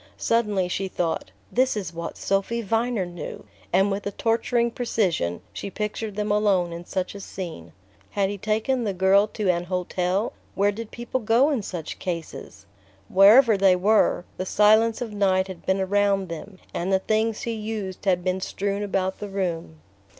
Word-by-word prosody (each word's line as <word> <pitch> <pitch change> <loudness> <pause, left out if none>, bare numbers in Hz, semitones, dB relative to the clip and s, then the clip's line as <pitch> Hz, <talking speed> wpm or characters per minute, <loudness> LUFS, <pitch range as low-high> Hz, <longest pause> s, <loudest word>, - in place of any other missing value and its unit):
Suddenly 210 -5 +1
she 190 +2 -2
thought: 170 - -2 0.2
"This 255 -2 +2
is 195 -4 -4
what 170 0 -6
Sophy 200 +4 -1
Viner 225 -1 0
knew"...and 160 - -2
with 200 +1 -3
a - - -2
torturing 235 +2 +1
precision 185 - -1
she - - -5
pictured 210 +1 -4
them 210 0 -1
alone 195 -5 +2
in 170 +1 -7
such 185 0 -3
a 200 - -8
scene...Had 170 - -5
he 205 - -6
taken 220 +5 0
the 200 -4 -2
girl 190 +3 +4
to 210 -1 -3
an 175 0 -2
hotel... 180 +3 -1 0.2
where 200 +1 +3
did 220 +1 -7
people 240 +2 -3
go 235 +6 +3
in 265 -6 0
such 175 -5 -6
cases? 165 - -6 0.4
Wherever 220 +5 +7
they 190 -1 +5
were, 195 -1 +3
the 185 - -3
silence 220 +3 +4
of 225 -3 -7
night 190 -2 +2
had 185 -3 -10
been 190 +1 +2
around 195 -1 +1
them, 185 +4 -8 0.2
and 180 +3 -2
the 190 - +5
things 220 +3 0
he 235 - -2
used 210 -3 -5
had 180 -2 +2
been 185 +1 -1
strewn 200 +1 -2
about 190 -2 -1
the 205 - -5
room... 170 - -3
195 Hz, 170 wpm, -24 LUFS, 180-215 Hz, 0.4 s, Wherever